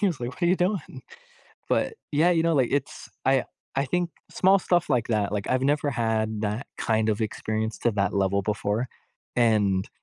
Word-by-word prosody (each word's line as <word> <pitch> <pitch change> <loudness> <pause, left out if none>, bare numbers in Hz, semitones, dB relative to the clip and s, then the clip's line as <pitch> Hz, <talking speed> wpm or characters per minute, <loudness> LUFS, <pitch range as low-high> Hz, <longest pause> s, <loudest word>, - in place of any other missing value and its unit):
He 205 - +3
was 170 -9 -1
like, 120 0 -3
"What 185 - -14
are - - +4
you 180 +2 +4
doing?" 180 -1 -2 0.7
But, - - +1 0.2
yeah, 160 +4 +4
you 165 -2 +2
know, 165 -1 +2
like, 130 -4 +2
it's 145 +2 -2 0.2
I 135 -1 +3 0.3
I 135 +1 +1
think 175 +5 0 0.2
small 195 +1 +4
stuff 175 -2 +1
like 125 -5 +1
that, 105 -3 0
like, 100 -1 -2
I've 130 - +2
never 145 +1 +2
had 110 -3 -1
that 105 +5 -2
kind 110 -1 +1
of 105 0 0
experience 110 +1 -2
to 120 - +2
that 100 -2 0
level 100 0 +1
before. 105 +3 -1 0.5
And, 105 -5 +2
120 Hz, 195 wpm, -26 LUFS, 110-155 Hz, 0.7 s, are